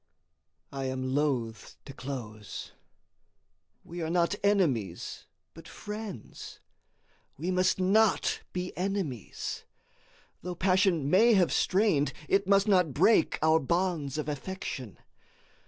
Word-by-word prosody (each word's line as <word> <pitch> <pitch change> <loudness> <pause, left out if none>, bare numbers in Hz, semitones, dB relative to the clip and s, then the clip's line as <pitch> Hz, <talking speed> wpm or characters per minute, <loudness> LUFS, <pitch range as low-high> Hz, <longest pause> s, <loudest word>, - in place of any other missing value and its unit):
I 135 -1 -4
am 130 0 -2
loathe 130 -6 0 0.3
to 135 - -9
close. 115 -7 -7 1.1
We 175 +1 -7
are 160 - -2
not 170 +2 +2
enemies, 140 - 0 0.3
but 165 0 -13
friends. 210 - -8 0.8
We 170 +6 -2
must 185 +1 +2
not 205 +3 +3
be 180 0 -4
enemies. 180 - -3 0.8
Though 180 0 -5
passion 185 -4 +2
may 220 +8 +5
have 180 -3 +3
strained, 180 -8 +2
it 195 0 +2
must 200 +1 +4
not 180 -9 +3
break 180 +3 +4
our 160 0 +5
bonds 160 -2 -1
of 155 -2 -3
affection. 145 - -5
170 Hz, 110 wpm, -29 LUFS, 135-190 Hz, 1.1 s, may